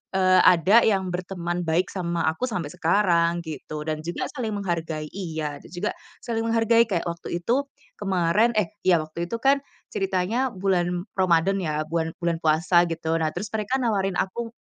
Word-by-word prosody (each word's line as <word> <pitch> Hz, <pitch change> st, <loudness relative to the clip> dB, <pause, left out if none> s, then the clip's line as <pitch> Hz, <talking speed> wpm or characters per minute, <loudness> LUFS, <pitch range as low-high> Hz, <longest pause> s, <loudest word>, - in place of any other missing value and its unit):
eee, 185 Hz, -1 st, +5 dB
ada 180 Hz, +6 st, +6 dB
yang 190 Hz, -4 st, +1 dB
berteman 175 Hz, -1 st, -3 dB
baik 175 Hz, +3 st, +1 dB
sama 170 Hz, -3 st, -2 dB
aku 205 Hz, +10 st, -3 dB
sampai 170 Hz, -8 st, -3 dB
sekarang, 175 Hz, -2 st, +2 dB
gitu. 155 Hz, -1 st, -6 dB
Dan 155 Hz, -1 st, -2 dB
juga 170 Hz, -, -3 dB
saling 230 Hz, -6 st, -3 dB
menghargai 165 Hz, -5 st, -3 dB
iya, 160 Hz, -6 st, -4 dB
dan -, -, -14 dB
juga, 190 Hz, +4 st, -2 dB, 0.3 s
saling 225 Hz, -1 st, -2 dB
menghargai 230 Hz, 0 st, +4 dB
kayak 180 Hz, -5 st, 0 dB
waktu 170 Hz, +1 st, -5 dB
itu 260 Hz, +8 st, +1 dB, 0.3 s
kemarin, 195 Hz, +3 st, +2 dB
eh 200 Hz, -5 st, +2 dB, 0.2 s
iya 180 Hz, -2 st, +6 dB
waktu 170 Hz, +2 st, -5 dB
itu 230 Hz, -, -2 dB
kan, 275 Hz, +1 st, +4 dB, 0.3 s
ceritanya 195 Hz, +7 st, 0 dB
bulan 180 Hz, -2 st, 0 dB
Ramadan 185 Hz, +1 st, +3 dB
ya, 155 Hz, -3 st, -1 dB
bulan 165 Hz, 0 st, -1 dB
bulan 170 Hz, -1 st, 0 dB
puasa 170 Hz, +3 st, +4 dB
gitu, 165 Hz, 0 st, -1 dB
nah 155 Hz, -, +1 dB
terus 210 Hz, -, -4 dB
mereka 220 Hz, +5 st, -1 dB
nawarin 195 Hz, -5 st, 0 dB
aku 230 Hz, +5 st, -3 dB
180 Hz, 170 wpm, -24 LUFS, 170-205 Hz, 0.3 s, ada